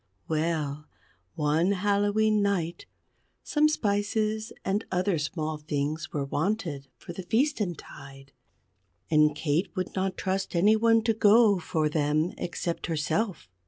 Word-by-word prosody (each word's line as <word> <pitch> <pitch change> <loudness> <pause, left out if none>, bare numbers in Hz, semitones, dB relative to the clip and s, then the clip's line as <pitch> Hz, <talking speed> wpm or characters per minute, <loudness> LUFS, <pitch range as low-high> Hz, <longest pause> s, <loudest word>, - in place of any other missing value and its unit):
Well, 155 -2 -2 0.5
one 160 +4 +2
Hallowe'en 205 +2 +2
Night, 180 -5 -1 0.6
some 305 0 +3
spices 215 -3 -1
and 200 +3 0
other 185 -2 +1
small 155 0 -3
things 150 +1 -3
were 145 -2 -2
wanted 155 -2 -2
for 175 - -9
the 190 - -6
feasten 220 - 0
tide, 135 -1 -13 0.8
and 150 -1 +4
Kate 160 +5 0
would 185 - -3
not 190 0 -2
trust 190 0 -2
any 205 +6 +5
one 225 0 +3
to 225 0 +2
go 215 -1 +5
for 155 -2 0
them 150 +2 0
except 170 -1 -3
herself. 165 - -1
180 Hz, 125 wpm, -27 LUFS, 155-205 Hz, 0.8 s, any